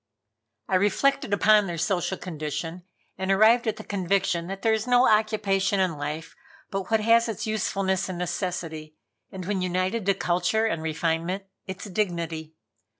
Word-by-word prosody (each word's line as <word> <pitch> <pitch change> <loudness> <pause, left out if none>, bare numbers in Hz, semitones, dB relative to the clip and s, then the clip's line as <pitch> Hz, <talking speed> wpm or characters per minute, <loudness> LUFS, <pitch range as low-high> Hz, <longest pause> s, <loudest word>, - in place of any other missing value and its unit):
I 185 - +3
reflected 205 +6 +1
upon 210 0 +4
their 170 -1 -4
social 180 +2 0
condition 165 +1 -5 0.3
and 190 0 -2
arrived 225 +4 +5
at 220 - +1
the 215 - -9
conviction 185 -3 0
that 195 +1 -6
there 225 - +4
is 220 +2 -1
no 245 +1 +5
occupation 205 -2 +2
in 185 -4 +1
life 150 +3 -5 0.4
but 195 -2 -3
what 220 -1 +2
has 230 +1 +4
its 220 - -4
usefulness 195 -3 -1
and 185 - -4
necessity, 170 -3 -4 0.4
and, 190 -3 -7
when 195 -1 -1
united 185 +4 -1
to 200 - +4
culture 180 +5 +1
and 165 -8 -1
refinement, 165 +4 -1 0.2
its 190 +1 -6
dignity. 170 -6 -3
190 Hz, 155 wpm, -26 LUFS, 170-210 Hz, 0.4 s, arrived